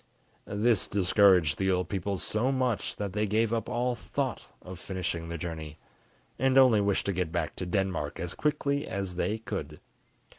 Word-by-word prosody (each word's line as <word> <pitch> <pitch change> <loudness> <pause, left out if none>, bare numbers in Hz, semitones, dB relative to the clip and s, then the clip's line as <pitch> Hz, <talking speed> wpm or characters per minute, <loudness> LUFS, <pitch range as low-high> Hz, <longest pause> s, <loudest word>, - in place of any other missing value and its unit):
This 105 0 +2
discouraged 95 -5 +4
the 95 0 +1
old 90 -1 +1
people 100 0 -2
so 110 +8 0
much 130 -4 -1
that 100 -3 -4
they 105 +1 0
gave 110 +2 +1
up 115 -1 -1
all 125 +1 0
thought 115 - -3 0.2
of 90 -1 -9
finishing 90 -3 -4
the 85 - -4
journey, 80 -2 -6 0.6
and 130 0 +3
only 125 -6 +6
wished 100 -1 +1
to 100 - 0
get 90 -2 -1
back - - -2
to 90 - -4
Denmark 90 -6 -1
as 85 0 -3
quickly 145 -1 0
as 95 -2 -4
they 105 +4 0
could. 85 -9 -6
100 Hz, 175 wpm, -29 LUFS, 90-115 Hz, 0.6 s, only